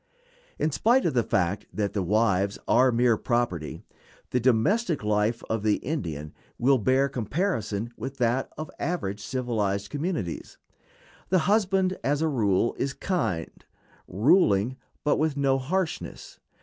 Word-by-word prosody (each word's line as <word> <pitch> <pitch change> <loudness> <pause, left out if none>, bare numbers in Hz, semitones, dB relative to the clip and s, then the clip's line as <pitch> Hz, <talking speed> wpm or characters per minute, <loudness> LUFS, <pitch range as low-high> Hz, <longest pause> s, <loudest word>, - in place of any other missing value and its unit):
In 155 - 0
spite 240 - +3
of - - +1
the 120 - +3
fact 90 -2 -1
that 105 -2 -2
the 100 - 0
wives 100 0 +1
are 130 +2 +5
mere 120 -1 +3
property, 115 -12 -2 0.5
the 125 - +2
domestic 140 - +2
life 105 +2 +1
of 110 -1 -1
the 105 0 +2
Indian 80 - -4 0.2
will 130 +2 +3
bear 130 +5 +3
comparison 120 - -2
with 130 +4 -6
that 120 +2 +1
of 155 +1 -6
average 105 - -2
civilized 105 -5 -2
communities. 145 - -3 0.7
The 185 - +4
husband, 190 -2 +2
as 145 +3 +1
a - - +2
rule, 115 -6 +1
is 140 - -1
kind; 135 - -2 0.4
ruling, 115 - +3 0.3
but 145 - +2
with 155 -2 0
no 135 -1 +2
harshness. 170 +6 -3
125 Hz, 135 wpm, -26 LUFS, 105-150 Hz, 0.7 s, are